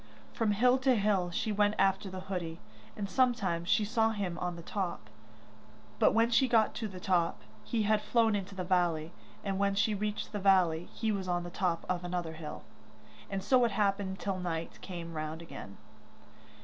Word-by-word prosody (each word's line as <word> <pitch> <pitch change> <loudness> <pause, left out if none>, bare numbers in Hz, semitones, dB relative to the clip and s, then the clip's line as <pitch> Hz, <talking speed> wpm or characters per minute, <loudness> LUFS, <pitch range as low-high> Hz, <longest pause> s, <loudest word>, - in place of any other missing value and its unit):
From 220 -2 +1
hill 250 +5 +4
to 260 -1 +3
hill 200 -4 +2
she 195 +5 -1
went 205 0 +2
after 195 0 +2
the 185 0 -6
hoodie, 180 -4 -4 0.4
and 205 -2 -2
sometimes 195 -7 +1
she 220 -1 +3
saw 225 +1 +2
him 200 -5 -2
on 180 -1 -2
the 170 - -9
top; 175 - -4 0.9
but - - +5
when 230 +1 +4
she 260 +3 +4
got 225 -3 +3
to 225 - -3
the 190 -3 -8
top, 175 -2 +1 0.2
he 225 - 0
had 210 0 +2
flown 225 -1 +2
into 200 0 -4
the 185 - -3
valley, 175 -3 +1 0.3
and 195 -1 -2
when 200 0 +2
she 220 +1 +2
reached 210 +1 -3
the 210 - -3
valley 180 -4 +3
he 220 -1 -1
was 195 -3 -2
on 175 -1 0
the 175 - -7
top 175 -2 -1
of 180 -1 -1
another 175 -2 -3
hill 160 -1 -7 0.7
and 195 -1 -3
so 250 +4 +4
it 235 - +3
happened 195 -2 0
till 195 -2 -2
night 165 -2 -4
came 170 -3 -7
round 155 0 -4
again. 135 -11 -9
195 Hz, 190 wpm, -31 LUFS, 175-215 Hz, 0.9 s, but